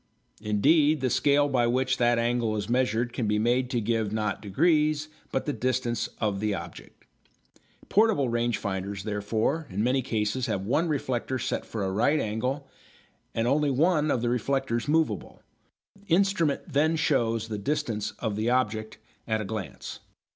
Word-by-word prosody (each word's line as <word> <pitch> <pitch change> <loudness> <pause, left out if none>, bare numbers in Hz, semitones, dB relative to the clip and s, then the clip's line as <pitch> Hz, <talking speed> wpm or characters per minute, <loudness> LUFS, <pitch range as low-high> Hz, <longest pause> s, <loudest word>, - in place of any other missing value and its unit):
Indeed 145 +9 +3
the 130 -2 0
scale 145 0 +3
by 125 -4 +2
which 130 +2 +1
that 120 0 +3
angle 115 -1 +1
is 105 -1 -3
measured 120 -1 +1
can 120 -4 -1
be 105 0 +2
made 120 +3 +1
to 125 - 0
give 110 -1 0
not 105 -1 -2
degrees, 155 - +2 0.2
but 135 - -1
the 145 - -1
distance 120 -3 -1
of 105 -3 0
the 105 -1 0
object. - - -10 0.8
Portable 210 - +3
range 120 0 0
finders, 95 0 -4
therefore, 110 +9 -1
in 100 +2 -2
many 130 +2 +2
cases 115 +1 -1
have 100 -4 -2
one 155 +10 +1
reflector 130 -4 -1
set - - -2
for 110 -3 -3
a 95 - -1
right 120 +10 +2
angle 125 +6 -2 0.7
and 115 +1 +1
only 145 +3 +2
one 155 +3 +2
of 120 -4 0
the 120 - +1
reflectors 125 0 -1
movable. 150 - 0 0.5
The 200 -4 0
instrument 195 -6 +1
then 155 +3 +3
shows 115 -8 +1
the 105 -2 -4
distance 115 -4 -2
of 110 -4 -2
the 110 +3 0
object 110 -3 0 0.3
at 110 -1 0
a 110 - -3
glance. 110 -1 -6
120 Hz, 165 wpm, -27 LUFS, 110-145 Hz, 0.8 s, Indeed